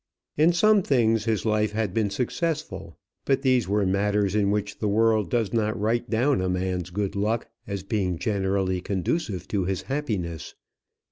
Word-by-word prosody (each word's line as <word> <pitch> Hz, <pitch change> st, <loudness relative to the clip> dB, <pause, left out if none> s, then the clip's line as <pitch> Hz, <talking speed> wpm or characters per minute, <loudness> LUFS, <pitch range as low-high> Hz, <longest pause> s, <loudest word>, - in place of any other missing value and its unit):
In 155 Hz, +3 st, +4 dB
some 210 Hz, +4 st, +4 dB
things 115 Hz, -, +2 dB
his 110 Hz, -1 st, 0 dB
life 110 Hz, -1 st, +1 dB
had 105 Hz, -4 st, -1 dB
been 110 Hz, -1 st, +1 dB
successful; 115 Hz, -, -3 dB, 0.3 s
but 135 Hz, 0 st, +1 dB
these 130 Hz, -6 st, +3 dB
were 100 Hz, +1 st, +1 dB
matters 100 Hz, +1 st, +1 dB
in 105 Hz, -2 st, +2 dB
which 105 Hz, 0 st, -2 dB
the 105 Hz, -, -1 dB
world 110 Hz, -2 st, +2 dB
does 115 Hz, -3 st, 0 dB
not 110 Hz, -2 st, 0 dB
write 115 Hz, +3 st, 0 dB
down 125 Hz, +1 st, +2 dB
a 95 Hz, -, -1 dB
man's 90 Hz, -1 st, -2 dB
good 100 Hz, +2 st, -3 dB
luck 110 Hz, +3 st, -1 dB, 0.2 s
as 100 Hz, -2 st, -4 dB
being 95 Hz, -4 st, -1 dB
generally 95 Hz, -1 st, 0 dB
conducive 95 Hz, -, -2 dB
to 100 Hz, -3 st, 0 dB
his 95 Hz, 0 st, -2 dB
happiness. 100 Hz, -, -3 dB
105 Hz, 165 wpm, -25 LUFS, 95-115 Hz, 0.3 s, In